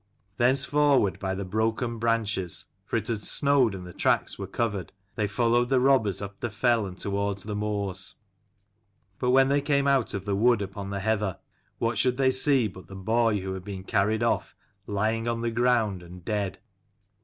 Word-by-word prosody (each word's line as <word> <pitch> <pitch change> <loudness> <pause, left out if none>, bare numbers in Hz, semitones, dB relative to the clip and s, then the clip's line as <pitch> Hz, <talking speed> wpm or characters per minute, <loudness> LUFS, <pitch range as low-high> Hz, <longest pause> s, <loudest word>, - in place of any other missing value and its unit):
Thence 130 +3 +3
forward 145 -9 +2
by 95 -1 -2
the 100 0 -4
broken 110 +4 -1
branches, 110 -6 -1 0.2
for - - 0
it - - -3
had 110 -3 -2
snowed 140 -7 +4
and 90 -1 -8
the 90 - -10
tracks - - 0
were 100 - -4
covered, 100 -3 -2 0.2
they 105 -2 -1
followed 120 +3 +1
the 135 -1 +3
robbers 125 -7 +2
up 100 0 -8
the 120 - -3
fell 115 0 +1
and 90 -1 -9
towards 100 -1 -2
the 105 -1 -5
moors. 100 -2 -2 1.0
But 125 - 0
when 135 +1 +5
they 140 +1 +2
came 140 -1 +1
out 135 -6 +2
of 95 -1 -5
the 100 -1 0
wood 115 0 +3
upon 100 0 -6
the 100 0 -3
heather, 105 -3 0 0.4
what 115 0 0
should 125 -1 +2
they 130 -1 +3
see 130 -2 +3
but 95 -2 -12
the 95 - -10
boy 110 +1 +1
who 95 0 -4
had 95 -1 -6
been 95 -1 -7
carried 105 +3 +1
off, - - 0 0.3
lying 110 +3 -1
on 115 -1 -1
the 115 0 -1
ground, 115 -5 +1
and 85 0 -12
dead. 100 -3 -2
110 Hz, 190 wpm, -26 LUFS, 100-120 Hz, 1.0 s, when